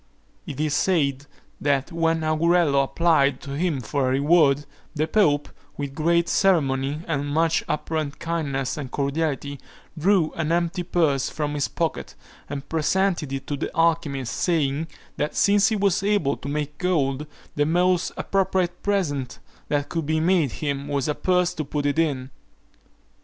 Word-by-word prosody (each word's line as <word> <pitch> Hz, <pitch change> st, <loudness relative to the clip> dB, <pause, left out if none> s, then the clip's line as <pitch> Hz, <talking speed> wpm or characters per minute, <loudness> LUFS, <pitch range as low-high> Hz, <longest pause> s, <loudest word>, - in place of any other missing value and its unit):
It 140 Hz, -, -6 dB
is 155 Hz, -1 st, 0 dB
said, 145 Hz, -6 st, +1 dB, 0.3 s
that 140 Hz, +2 st, +1 dB
when 165 Hz, -1 st, +1 dB
Augurello 155 Hz, -2 st, +3 dB
applied 140 Hz, -3 st, +2 dB
to 140 Hz, -, -8 dB
him 150 Hz, -1 st, -1 dB
for 135 Hz, +3 st, -1 dB
a -, -, +1 dB
reward, 145 Hz, 0 st, +3 dB, 0.3 s
the 155 Hz, +1 st, +1 dB
pope, 150 Hz, -9 st, +2 dB, 0.3 s
with 140 Hz, -1 st, -4 dB
great 170 Hz, +3 st, +2 dB
ceremony 145 Hz, -6 st, +1 dB
and 145 Hz, -3 st, -1 dB
much 160 Hz, +2 st, +1 dB
apparent 150 Hz, -1 st, -2 dB
kindness 145 Hz, -6 st, -2 dB
and 140 Hz, -4 st, -5 dB
cordiality, 140 Hz, 0 st, -2 dB, 0.4 s
drew 170 Hz, 0 st, +2 dB
an 160 Hz, -1 st, -2 dB
empty 175 Hz, +2 st, 0 dB
purse 160 Hz, -6 st, +1 dB
from 150 Hz, -1 st, -3 dB
his 145 Hz, -1 st, 0 dB
pocket, 165 Hz, -2 st, -3 dB, 0.3 s
and 140 Hz, 0 st, -5 dB
presented 165 Hz, -1 st, 0 dB
it 135 Hz, 0 st, -4 dB
to 145 Hz, -, -3 dB
the -, -, -3 dB
alchymist, 155 Hz, -7 st, +1 dB
saying, 155 Hz, -3 st, 0 dB, 0.3 s
that 150 Hz, +1 st, -2 dB
since 200 Hz, 0 st, +4 dB
he 220 Hz, -, 0 dB
was 200 Hz, -3 st, +1 dB
able 195 Hz, -9 st, +1 dB
to 140 Hz, -, -7 dB
make 150 Hz, 0 st, -3 dB
gold, 150 Hz, -5 st, 0 dB, 0.3 s
the 145 Hz, 0 st, +1 dB
most 180 Hz, +2 st, +2 dB
appropriate 185 Hz, -2 st, 0 dB
present 145 Hz, -11 st, -1 dB, 0.3 s
that 145 Hz, -1 st, -1 dB
could 165 Hz, -3 st, -3 dB
be 160 Hz, 0 st, +1 dB
made 165 Hz, -5 st, +2 dB
him, 140 Hz, -2 st, -3 dB
was 140 Hz, -1 st, -1 dB
a 150 Hz, -, +1 dB
purse 180 Hz, +2 st, +1 dB
to 155 Hz, -, -3 dB
put 145 Hz, 0 st, -3 dB
it 145 Hz, +2 st, +1 dB
in. 140 Hz, -5 st, 0 dB
155 Hz, 160 wpm, -24 LUFS, 140-170 Hz, 0.4 s, since